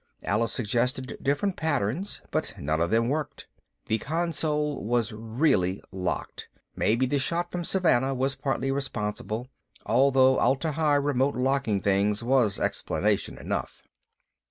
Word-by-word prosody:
Alice 105 Hz, +1 st, 0 dB
suggested 125 Hz, +4 st, -1 dB
different 145 Hz, +8 st, 0 dB
patterns, 150 Hz, -, -1 dB
but -, -, -1 dB
none 80 Hz, +3 st, -1 dB
of 85 Hz, -, +1 dB
them 115 Hz, +3 st, +2 dB
worked. 150 Hz, +2 st, -3 dB, 0.4 s
That 110 Hz, -1 st, 0 dB
console 150 Hz, -3 st, -1 dB
was 120 Hz, +1 st, 0 dB
really 110 Hz, -, +1 dB
locked 95 Hz, -1 st, -4 dB, 0.3 s
maybe 120 Hz, +4 st, +2 dB
the 140 Hz, +2 st, 0 dB
shot 170 Hz, +5 st, -1 dB
from 175 Hz, -1 st, -3 dB
Savannah 135 Hz, -8 st, +2 dB
was 135 Hz, +1 st, 0 dB
partly 135 Hz, 0 st, -1 dB
responsible, 115 Hz, -3 st, -3 dB, 0.4 s
though 130 Hz, +2 st, +4 dB
Atla 140 Hz, +4 st, +2 dB
Hi 150 Hz, -1 st, +2 dB
remote 140 Hz, -1 st, +1 dB
locking 130 Hz, -5 st, +1 dB
things 100 Hz, +2 st, +1 dB
was 120 Hz, -5 st, +2 dB
explanation -, -, -1 dB
enough. -, -, -4 dB
130 Hz, 130 wpm, -27 LUFS, 110-145 Hz, 0.4 s, though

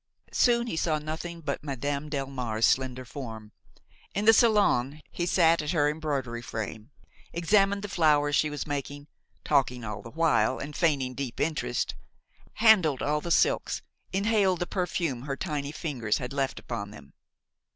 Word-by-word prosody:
Soon 235 Hz, -1 st, +3 dB
he 235 Hz, -, -3 dB
saw 160 Hz, -1 st, +1 dB
nothing 160 Hz, +3 st, -6 dB
but 145 Hz, -2 st, -3 dB
Madame 140 Hz, +1 st, -3 dB
Delmare's 130 Hz, -6 st, -1 dB
slender 130 Hz, -1 st, +1 dB
form. 110 Hz, -5 st, -8 dB, 0.6 s
In 205 Hz, +2 st, 0 dB
the 225 Hz, -, +8 dB
salon 180 Hz, -, +3 dB
he 175 Hz, -, -2 dB
sat 170 Hz, -2 st, +4 dB
at 150 Hz, +2 st, -2 dB
her 145 Hz, -3 st, +3 dB
embroidery 140 Hz, -6 st, -2 dB
frame, 110 Hz, 0 st, -6 dB, 0.4 s
examined 195 Hz, +4 st, +2 dB
the -, -, -3 dB
flowers 150 Hz, -5 st, +3 dB
she 155 Hz, -, +2 dB
was 150 Hz, -1 st, -4 dB
making–talking 145 Hz, -2 st, -2 dB
all 105 Hz, -1 st, -5 dB
the 115 Hz, -, -10 dB
while 130 Hz, -6 st, +2 dB
and 145 Hz, +1 st, -7 dB
feigning 140 Hz, -6 st, +1 dB
deep 130 Hz, -2 st, -5 dB
interest–handled 165 Hz, -, 0 dB
all 150 Hz, +1 st, 0 dB
the 170 Hz, -, -5 dB
silks, 455 Hz, -, +2 dB, 0.3 s
inhaled 200 Hz, -1 st, +2 dB
the -, -, +1 dB
perfume 175 Hz, -8 st, -2 dB
her 135 Hz, +1 st, -4 dB
tiny 145 Hz, -5 st, -3 dB
fingers 130 Hz, -10 st, -2 dB
had 125 Hz, +1 st, -5 dB
left 135 Hz, -1 st, -1 dB
upon 110 Hz, -4 st, -5 dB
them. 70 Hz, -9 st, -14 dB
145 Hz, 150 wpm, -28 LUFS, 130-170 Hz, 0.6 s, the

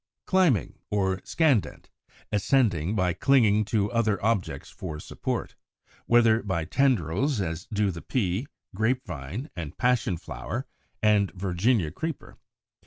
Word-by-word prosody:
Climbing 175 Hz, -, +2 dB
or 95 Hz, -2 st, 0 dB
Scandent, 145 Hz, -, +1 dB, 0.4 s
ascending 105 Hz, -, +2 dB
by 90 Hz, -3 st, +1 dB
clinging 110 Hz, 0 st, +3 dB
to 105 Hz, -1 st, 0 dB
other 110 Hz, -3 st, +2 dB
objects 110 Hz, -5 st, -1 dB
for 80 Hz, -5 st, -6 dB
support, -, -, -4 dB, 0.5 s
whether 115 Hz, -1 st, +5 dB
by 90 Hz, -6 st, -2 dB
tendrils, 125 Hz, -, +1 dB
as 85 Hz, -3 st, -3 dB
do 105 Hz, -2 st, +1 dB
the 85 Hz, -1 st, -7 dB
Pea, 105 Hz, +1 st, -1 dB, 0.3 s
Grape 120 Hz, +6 st, 0 dB
Vine, 90 Hz, -, -6 dB
and 80 Hz, -5 st, -6 dB
Passion 125 Hz, -8 st, +1 dB
flower -, -, -5 dB, 0.4 s
and 105 Hz, -2 st, +4 dB
Virginia 95 Hz, 0 st, +1 dB
Creeper 160 Hz, -, -5 dB
(Fig. -, -, -23 dB
105 Hz, 125 wpm, -27 LUFS, 90-120 Hz, 0.5 s, whether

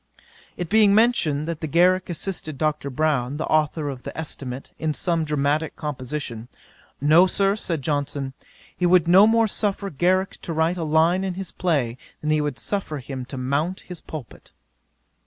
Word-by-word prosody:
'It 175 Hz, -, -3 dB
being 210 Hz, +1 st, +5 dB
mentioned, 170 Hz, -11 st, +2 dB
that 165 Hz, -2 st, -3 dB
Garrick 180 Hz, +4 st, +3 dB
assisted 170 Hz, -4 st, -3 dB
Dr. 150 Hz, -2 st, -1 dB
Brown, 140 Hz, -2 st, 0 dB
the 160 Hz, -, -2 dB
authour 155 Hz, 0 st, +1 dB
of 135 Hz, -3 st, -5 dB
the -, -, -8 dB
Estimate, 135 Hz, -4 st, -6 dB
in 155 Hz, -1 st, -1 dB
some 170 Hz, -3 st, 0 dB
dramatick 150 Hz, +1 st, 0 dB
composition, 130 Hz, -5 st, -5 dB, 0.5 s
"No, 155 Hz, +6 st, +6 dB
Sir, 195 Hz, +1 st, +1 dB
(said 165 Hz, -8 st, -3 dB
Johnson,) 145 Hz, -2 st, -2 dB, 0.4 s
he 180 Hz, -, +1 dB
would 175 Hz, -2 st, +4 dB
no 190 Hz, +4 st, +7 dB
more 230 Hz, 0 st, +4 dB
suffer 200 Hz, -1 st, -1 dB
Garrick 185 Hz, +6 st, 0 dB
to 165 Hz, -, -5 dB
write 160 Hz, +3 st, +1 dB
a 170 Hz, -, -2 dB
line 160 Hz, +4 st, +3 dB
in 190 Hz, -2 st, -2 dB
his 190 Hz, 0 st, -6 dB
play, 135 Hz, -9 st, -1 dB, 0.2 s
than 155 Hz, -, -1 dB
he 155 Hz, 0 st, +3 dB
would 145 Hz, -3 st, -2 dB
suffer 195 Hz, -7 st, -2 dB
him 130 Hz, -1 st, -6 dB
to 135 Hz, +1 st, -8 dB
mount 145 Hz, +8 st, -1 dB
his 180 Hz, -2 st, -9 dB
pulpit." 150 Hz, -7 st, -10 dB
155 Hz, 170 wpm, -23 LUFS, 145-180 Hz, 0.5 s, no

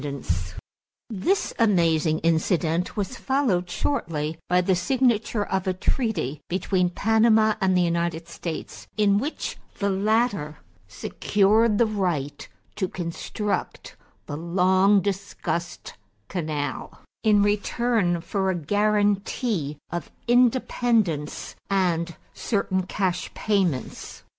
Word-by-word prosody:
JUNE, 140 Hz, -2 st, -5 dB
1913] 90 Hz, -, -7 dB
This 385 Hz, -, +1 dB
amazing 165 Hz, -7 st, +3 dB
incident 165 Hz, +2 st, +1 dB
was 210 Hz, +5 st, -2 dB
followed 240 Hz, -11 st, 0 dB
shortly 165 Hz, -, -2 dB
by 180 Hz, 0 st, +4 dB
the 180 Hz, +1 st, +2 dB
signature 235 Hz, -1 st, +1 dB
of 190 Hz, 0 st, -2 dB
a 185 Hz, -, +1 dB
treaty 180 Hz, -, -1 dB
between 180 Hz, 0 st, +1 dB
Panama 220 Hz, +2 st, +3 dB
and 185 Hz, -1 st, +3 dB
the 180 Hz, -, +4 dB
United 170 Hz, -1 st, -1 dB
States 170 Hz, -1 st, -6 dB
in 205 Hz, -1 st, +4 dB
which 290 Hz, +7 st, -4 dB, 0.2 s
the 200 Hz, -1 st, 0 dB
latter 200 Hz, -6 st, +1 dB, 0.3 s
secured 205 Hz, -, +2 dB
the 235 Hz, -, +4 dB
right 180 Hz, -10 st, -2 dB, 0.3 s
to 190 Hz, -3 st, 0 dB
construct 185 Hz, +4 st, -4 dB, 0.3 s
the 145 Hz, -, -5 dB
long 185 Hz, +4 st, +3 dB
discussed 190 Hz, -3 st, -4 dB, 0.4 s
canal, 155 Hz, -5 st, -4 dB, 0.2 s
in 210 Hz, -2 st, +5 dB
return 205 Hz, -3 st, +1 dB
for 190 Hz, +2 st, -1 dB
a 190 Hz, -, +1 dB
guarantee 205 Hz, -, 0 dB
of 175 Hz, -2 st, -4 dB, 0.2 s
independence 235 Hz, -, +1 dB
and 175 Hz, -4 st, +1 dB, 0.2 s
certain 190 Hz, -4 st, -1 dB
cash 185 Hz, -3 st, -1 dB
payments. 190 Hz, -, -1 dB
190 Hz, 110 wpm, -25 LUFS, 170-215 Hz, 0.4 s, in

